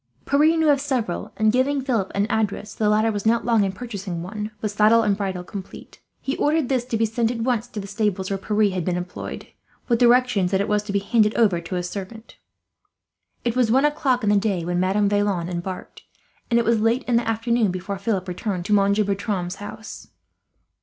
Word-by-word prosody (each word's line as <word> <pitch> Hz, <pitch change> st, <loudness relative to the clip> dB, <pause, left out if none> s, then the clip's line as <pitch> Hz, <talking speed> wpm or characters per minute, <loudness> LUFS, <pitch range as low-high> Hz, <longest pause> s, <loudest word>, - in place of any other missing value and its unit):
Pierre 305 Hz, +4 st, +3 dB
knew 320 Hz, -1 st, +3 dB
of 280 Hz, -1 st, +2 dB
several 250 Hz, -11 st, -2 dB
and, 215 Hz, 0 st, +3 dB
giving 265 Hz, +4 st, +1 dB
Philip 240 Hz, -8 st, -1 dB
an 200 Hz, +1 st, +2 dB
address, 215 Hz, -1 st, -2 dB
the 210 Hz, -1 st, 0 dB
latter 215 Hz, +1 st, +3 dB
was 205 Hz, -2 st, -3 dB
not 225 Hz, -1 st, +2 dB
long 230 Hz, -3 st, +3 dB
in 195 Hz, -, 0 dB
purchasing 195 Hz, -5 st, -6 dB
one, 210 Hz, +3 st, -5 dB
with 215 Hz, -, -2 dB
saddle 215 Hz, +2 st, +4 dB
and 205 Hz, -2 st, +2 dB
bridle 190 Hz, -3 st, -3 dB
complete. 190 Hz, +1 st, -10 dB, 0.2 s
He 270 Hz, -, -3 dB
ordered 300 Hz, -3 st, +1 dB
this 255 Hz, -3 st, +1 dB
to 240 Hz, -2 st, -2 dB
be 225 Hz, -, +2 dB
sent, 225 Hz, +1 st, 0 dB
at 235 Hz, -1 st, -3 dB
once, 240 Hz, -1 st, 0 dB
to 225 Hz, -, -7 dB
the 195 Hz, -, -6 dB
stables 200 Hz, -2 st, -2 dB
where 195 Hz, -, -1 dB
Pierre 210 Hz, 0 st, +1 dB
had 180 Hz, -2 st, -2 dB
been 180 Hz, +1 st, -1 dB
employed, 180 Hz, 0 st, -6 dB, 0.4 s
with 235 Hz, -2 st, +2 dB
directions 245 Hz, -6 st, +4 dB
that 190 Hz, 0 st, +1 dB
it 200 Hz, -, 0 dB
was 210 Hz, 0 st, +1 dB
to 205 Hz, -, -4 dB
be 200 Hz, -, +1 dB
handed 210 Hz, +1 st, +2 dB
over 200 Hz, -7 st, +3 dB
to 170 Hz, +2 st, -5 dB
his 180 Hz, 0 st, -2 dB
servant. 205 Hz, +4 st, -8 dB, 1.1 s
It 235 Hz, -1 st, 0 dB
was 250 Hz, -3 st, +2 dB
one 265 Hz, +4 st, +4 dB
o'clock 270 Hz, -5 st, +1 dB
in 205 Hz, -, +3 dB
the 205 Hz, -, +4 dB
day 195 Hz, -5 st, 0 dB
when 175 Hz, 0 st, -1 dB
Madame 195 Hz, +3 st, +2 dB
Vaillant 200 Hz, -4 st, 0 dB
embarked, 180 Hz, +1 st, -6 dB, 0.5 s
and 235 Hz, -, +3 dB
it 235 Hz, -, +2 dB
was 230 Hz, -1 st, +3 dB
late 225 Hz, +4 st, +1 dB
in 240 Hz, -2 st, +1 dB
the 235 Hz, -, -1 dB
afternoon 230 Hz, -1 st, +1 dB
before 185 Hz, +2 st, -4 dB
Philip 195 Hz, -2 st, -1 dB
returned 180 Hz, 0 st, -3 dB
to 210 Hz, -, 0 dB
Monsieur 200 Hz, +1 st, +3 dB
Bertram's 195 Hz, -2 st, -2 dB
house. 215 Hz, +2 st, -9 dB
210 Hz, 215 wpm, -23 LUFS, 195-235 Hz, 1.1 s, saddle